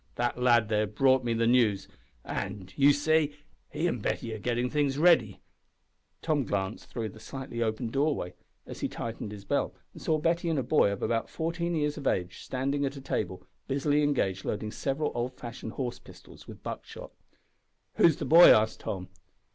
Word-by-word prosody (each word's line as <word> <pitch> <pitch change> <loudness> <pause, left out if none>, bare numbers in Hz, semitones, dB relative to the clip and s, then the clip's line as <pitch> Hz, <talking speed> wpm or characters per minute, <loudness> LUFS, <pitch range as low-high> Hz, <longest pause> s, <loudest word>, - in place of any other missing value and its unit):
That 120 0 -1
lad 120 -3 +4
there 105 -1 +1
brought 130 +5 +3
me 120 -1 0
the 115 0 +1
news, 115 -5 +3 0.4
and, 95 -1 -5
you 140 +1 +6
see, 150 +1 +2 0.3
he 170 - -1
an' 125 - -1
Betty 115 +2 -2
are 110 - -6
getting 120 +3 0
things 140 0 0
ready." 150 - +4 0.8
Tom 155 -4 +1
glanced 100 -2 -3
through 115 -3 -4
the 110 - -13
slightly 130 0 -6
opened 110 +1 -1
doorway, 140 - 0 0.3
as - - -9
he - - -1
tightened 115 -2 -6
his 100 -1 -9
belt, - - -1 0.2
and - - -12
saw 155 - +1
Betty 170 +2 0
and 160 - 0
a 135 - 0
boy 125 -5 +3
of 100 - -4
about 115 -1 0
fourteen 170 +1 -2
years 150 -1 -1
of 140 - -3
age 90 0 -1
standing 140 +2 -2
at 140 0 -2
a - - -8
table, 95 -8 -3 0.2
busily 145 +2 +1
engaged 110 -10 0
loading 105 +1 -3
several 140 +5 -2
old 120 +2 -3
fashioned 115 -1 -7
horse 125 -3 -4
pistols - - -15
with - - -11
buckshot. - - -7 0.9
"Who's 165 -3 +6
the - - -5
boy?" 170 +2 +9
asked 110 0 +3
Tom. 90 -2 -5
125 Hz, 185 wpm, -29 LUFS, 110-145 Hz, 0.9 s, boy